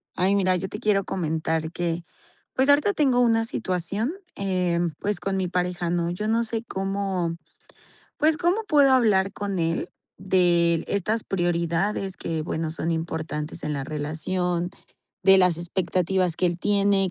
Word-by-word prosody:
Ay, 190 +2 +2
mira, 185 -2 +2
yo 190 +2 -3
te 210 - -6
quiero 210 -3 +2
comentar 160 -2 -2
que, 170 -1 -3 0.5
pues, 265 +2 +2
ahorita 295 +8 +4
tengo 270 -8 +2
una 225 -2 +3
situación, 200 - -2 0.2
eh, 180 -3 0 0.2
pues, 205 0 -2
con 195 -1 -2
mi 185 -1 0
pareja, 180 -1 -1
¿no? 170 0 0
Yo 210 +5 -3
no 225 +1 +2
sé 225 0 -3
cómo, 195 -4 -2 0.8
pues, 310 +1 +3
cómo 355 +8 +1
puedo 290 -9 +4
hablar 205 -6 +3
con 200 -2 -3
él 165 0 -1 0.3
de 175 -3 +2
estas 210 +3 -1
prioridades 175 +2 -1
que, 160 -1 -3
bueno, 160 0 -3
son 165 +1 -2
importantes 160 -1 -4
en 150 - -2
la 140 -2 -2
relación. 170 +5 -2 0.5
De 195 0 +8
las 180 -3 +4
expectativas 180 0 0
que 185 - +2
él 175 -1 0
tiene, 200 -1 +2
185 Hz, 155 wpm, -25 LUFS, 170-205 Hz, 0.8 s, De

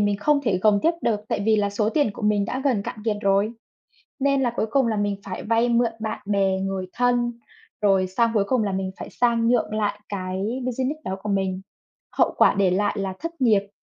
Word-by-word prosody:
mình 205 -1 +2
không 285 +8 +2
thể 210 -8 +1
gồng 205 +1 +4
tiếp 330 - +4
được 215 -3 +1
tại - - -1
vì 220 -1 +4
là 205 -1 +1
số 210 +1 0
tiền 290 -3 +2
của 220 - -10
mình 210 -1 +2
đã 255 - -3
gần 245 -8 +2
cạn 240 +3 -6
kiệt 220 -2 0
rồi. 200 +2 +2 0.7
Nên 275 0 +2
là 240 -2 +1
cuối - - 0
cùng 270 0 +3
là 220 -2 0
mình 205 -1 0
phải 190 -2 -6
vay 230 +2 +2
mượn 235 -1 +2
bạn 220 0 -3
bè, 195 -2 +1
người 190 -1 -3
thân, 245 -1 +1 0.5
rồi 195 -2 +3
sang 230 +5 +1
cuối 205 -2 +3
cùng 250 +1 +1
là 200 - -1
mình 190 0 -2
phải - - -7
sang 235 -1 +1
nhượng 240 -3 +1
lại 210 -1 -1
cái 195 +5 -3
business 260 +5 -2
đó 190 - -3
của 210 - -3
mình. 190 -1 -1 0.6
Hậu - - +3
quả - - +5
để 195 -2 +2
lại 205 +4 0
là 195 -1 -3
thất 335 0 -6
nghiệp, 210 -5 +3
210 Hz, 230 wpm, -23 LUFS, 195-240 Hz, 0.7 s, quả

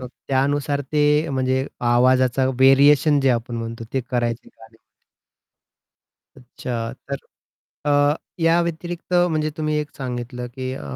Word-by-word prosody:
मग 125 - -7 0.2
त्यानुसार 140 +1 0
ते 150 -1 +3 0.3
म्हणजे 130 0 0 0.2
आवाजाचा 130 +1 +3
व्हेरिएशन 140 +3 +5
जे 135 - +2
आपण 120 0 -2
म्हणतो 115 0 -5
ते 135 - 0
करायचे 120 -2 -3
गाण्यावर 110 0 -18
ते. - - -22 1.6
अच्छा 120 -2 -5 0.2
तर 140 - -2 0.7
अ, 145 0 +3 0.3
या 165 +1 +4
व्यतिरिक्त 170 +1 -4 0.2
म्हणजे 155 -1 0
तुम्ही 155 -1 -1
एक 150 0 -3
सांगितलं 125 -1 -5
की 130 -1 -4
अ, - - -8
130 Hz, 130 wpm, -22 LUFS, 125-145 Hz, 1.6 s, व्हेरिएशन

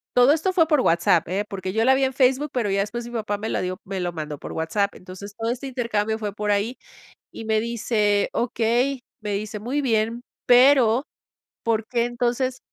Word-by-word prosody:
todo 250 +3 +6
esto 325 +4 0
fue 330 -4 +4
por 300 -5 +3
WhatsApp, 170 -2 +3
¿eh? 200 +3 -1
Porque 190 -1 -4
yo 225 +1 +2
la 265 +1 +5
vi 270 - +1
en 265 - +2
Facebook, 265 +3 +2
pero 235 -5 0
ya 195 0 +1
después 235 +4 -4
mi - - -9
papá 210 -3 -2
me 220 - -5
la - - -1
dio 185 0 -3
me 195 0 -4
lo 175 - -1
mandó 150 -2 -5
por - - -8
WhatsApp. 200 +5 -1
Entonces, 185 +2 -10
todo 225 0 -2
este 255 +3 -5
intercambio 220 -4 -1
fue 210 -2 -4
por 210 0 -1
ahí 210 +5 0 0.6
y - - -8
me 220 0 +1
dice: 215 -3 0
"Okey". 240 +3 0 0.2
Me 210 -1 -3
dice: 210 +1 -4
"Muy 260 +7 -2
bien, 230 -1 0 0.2
pero 250 -1 +6 0.6
¿por 225 -1 0
qué 235 0 0
entonces?". 245 +2 -1
225 Hz, 210 wpm, -23 LUFS, 205-250 Hz, 0.6 s, todo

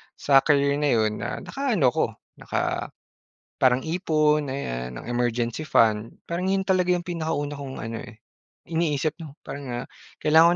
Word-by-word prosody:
sa 135 -1 +5
career 140 -1 +3
na 150 -1 +2
'yon 110 -1 +1
nakaano 210 - 0
ko 160 - +3 0.3
naka - - -2 0.7
parang 130 0 +4
ipon 155 -3 +2
ayan 60 - -4
ng - - -9
emergency 120 +2 0
fund 110 -3 +3
parang 175 +2 -1
yun 195 0 +2
talaga 185 -2 +2
yung 175 - -1
pinakauna 155 -4 -2
kong 135 -2 -6
ano 115 0 -4
eh, 120 -3 -13 0.5
iniisip 155 -2 0
'no, 155 -4 -9
parang 140 0 -7 0.2
ah - - -11 0.4
kailangan 160 +3 +6
145 Hz, 150 wpm, -25 LUFS, 120-165 Hz, 0.7 s, kailangan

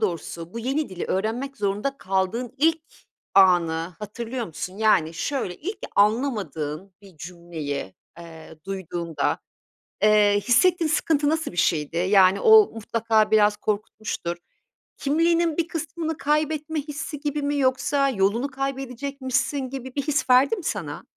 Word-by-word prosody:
doğrusu 170 -3 -4
bu - - -4
yeni 270 +6 -1
dili 185 -2 -5
öğrenmek 235 +8 -2
zorunda 205 +7 -2
kaldığın 195 +6 -2
ilk 320 +2 +2 0.5
anı 175 -3 +4
hatırlıyor 230 +3 -5
musun? 185 +3 -7
Yani, 185 -7 +3
şöyle, 190 - -3
ilk 390 +7 -6 0.2
anlamadığın 195 - 0
bir 195 -4 -16
cümleyi, 160 - -6 0.2
eee, 160 -1 -12
duyduğunda, 170 -5 -2 0.6
eee, 210 -1 +5
hissettiğin 340 +6 +4
sıkıntı 300 -2 +1
nasıl 320 -4 -1
bir 175 - -12
şeydi? 160 -2 0
Yani, 190 +2 +4
o 440 -2 +7
mutlaka 225 -1 +1
biraz 210 -1 +4
korkutmuştur. 205 -4 -3 0.6
Kimliğinin 330 +2 +1
bir 335 -1 0
kısmını 320 0 -4
kaybetme 305 +1 0
hissi 295 0 -6
gibi 295 0 -2
mi, 290 0 -1
yoksa 275 +1 +2
yolunu 215 +3 +1
kaybedecekmişsin 275 0 -3
gibi 260 -1 -7
bir 285 - 0
his 280 -2 -1
verdi 255 - +5
mi 380 - -8
sana? - - -4
230 Hz, 130 wpm, -24 LUFS, 185-285 Hz, 0.6 s, o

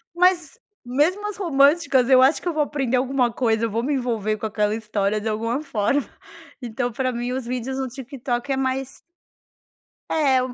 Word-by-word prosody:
Mas 360 +4 +2 0.3
mesmo 330 +12 +1
as 420 - -5
românticas 280 -5 +3
eu 255 -1 +7
acho 270 +4 +4
que - - -6
eu 340 - 0
vou 305 -1 +2
aprender 270 -4 -1
alguma 255 -2 +1
coisa, 230 -2 +1
vou 225 +2 -2
me 290 +2 0
envolver 220 -4 -1
com 220 - -5
aquela 210 0 0
história 210 -1 -1
de 220 - -4
alguma 230 +6 -1
forma. 270 +1 0 0.5
Então, 245 +1 -3
pra 255 +2 -1
mim 245 +1 -3
os 260 -2 -3
vídeos 255 +2 -3
no 265 - -2
TikTok 260 0 -4
é 265 - +1
mais 265 0 -2 1.1
É. 275 -5 +3
255 Hz, 175 wpm, -23 LUFS, 230-280 Hz, 1.1 s, eu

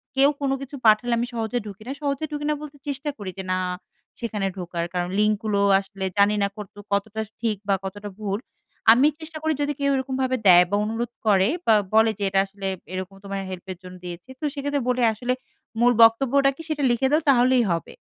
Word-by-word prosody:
কেউ 275 +1 +5
কোন 275 -1 +1
কিছু 275 +1 -7
পাঠালে 220 +3 +5
আমি 240 +1 -1
সহজে 225 +1 -2
ঢুকি 205 0 -9
না। - - -3
সহজে 285 +1 -1
ঢুকি 295 0 -4
না - - +3
বলতে 295 -1 -9
চেষ্টা 285 +1 -2
করি 200 -3 -6
যে 190 - -4
না 185 - +1 0.6
সেখানে 210 -4 -2
ঢোকার। 175 -2 -3
কারণ 180 0 -1
লিঙ্ক 210 0 +3
গুলো 205 -2 +1 0.2
আসলে 195 0 -6
জানি 205 +1 +4
না 200 - +3
কতটুকু 205 -1 -10
কতটা 215 +2 -1 0.2
ঠিক 220 -3 0
বা 195 - +5
কতটা 205 +2 -6
ভুল। 205 -1 -2 0.5
আমি 255 +6 +6
চেষ্টা 315 0 -6
করি 315 0 +2
যদি 290 0 0
কেউ 280 0 +1
এরকমভাবে 260 -1 -1
দেয় 180 -1 +9
বা - - +2
অনুরোধ 230 +2 -3 0.2
করে 195 -1 +5 0.2
বা 225 - +5 0.2
বলে 220 0 +5
যে 200 - -2
এটা 195 0 +2
আসলে 195 0 -7 0.3
এরকম 185 +1 -5
তোমার 195 0 -4
হেল্পের 185 0 -7
জন্য 180 0 -10
দিয়েছি। 175 +6 -8
তো - - -13
সেক্ষেত্রে 285 0 -2
বলে 250 0 +1
আসলে 245 +3 -1 0.5
মূল 245 +1 +5
বক্তব্যটা 270 +4 +4
কি 325 - -9
সেটা 300 -2 -1
লিখে 245 +3 +2
দাও 310 +2 +4
তাহলেই 250 -1 +5
হবে। 165 - -3
220 Hz, 205 wpm, -24 LUFS, 200-270 Hz, 0.6 s, দেয়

